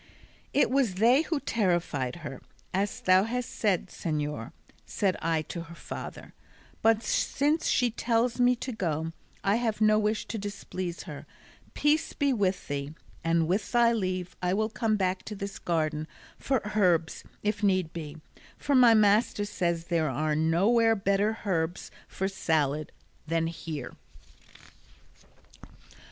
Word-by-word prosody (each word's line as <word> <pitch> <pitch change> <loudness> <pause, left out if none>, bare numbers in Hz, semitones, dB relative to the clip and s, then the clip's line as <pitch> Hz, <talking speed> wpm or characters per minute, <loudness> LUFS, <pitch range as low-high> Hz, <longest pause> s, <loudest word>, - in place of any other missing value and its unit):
"It 285 - +3
was 260 -8 +2
they 235 +8 +5
who 320 -2 -1
terrified 175 - 0
her, 135 -3 -7 0.3
as 195 +2 -1
thou 185 +1 +5
hast 245 +1 -3
said, 200 -5 0
señor," 150 -6 -3 0.3
said 195 -3 0
I 160 -1 +1
to 170 +3 -6
her 170 +1 -11
father; - - -8 0.5
"but 225 0 +3
since 295 +8 +1
she 245 -1 +2
tells 235 +1 0
me 245 0 +5
to 255 +2 -5
go, 165 -7 -2 0.3
I 200 +2 +3
have 225 -3 -1
no 215 0 +5
wish 215 +1 0
to 225 - -3
displease 190 -3 -5
her: 150 -5 -9 0.5
peace 300 +1 +2
be 280 -2 +1
with 195 -5 0
thee, 140 +2 -4 0.3
and 165 -1 +2
with 195 +4 -1
thy 235 -1 +5
leave 185 -4 -2
I 180 +1 +1
will 215 +1 0
come 220 -1 0
back 185 -1 0
to 210 - -6
this 200 0 -6
garden 155 -2 -1 0.3
for 245 -6 -1
herbs 175 -6 +2 0.2
if 210 0 -1
need 185 -5 +1
be, 155 -2 -6 0.4
for 285 - -1
my 245 -3 +7
master 210 0 +3
says 170 -5 -1
there 165 -3 +1
are 150 +4 0
nowhere 200 +9 +3
better 200 +2 +1
herbs 175 -2 -1 0.2
for 190 - -2
salad 155 -6 0 0.4
then 165 +1 +1
here." 160 -4 -5
195 Hz, 145 wpm, -28 LUFS, 165-225 Hz, 0.5 s, my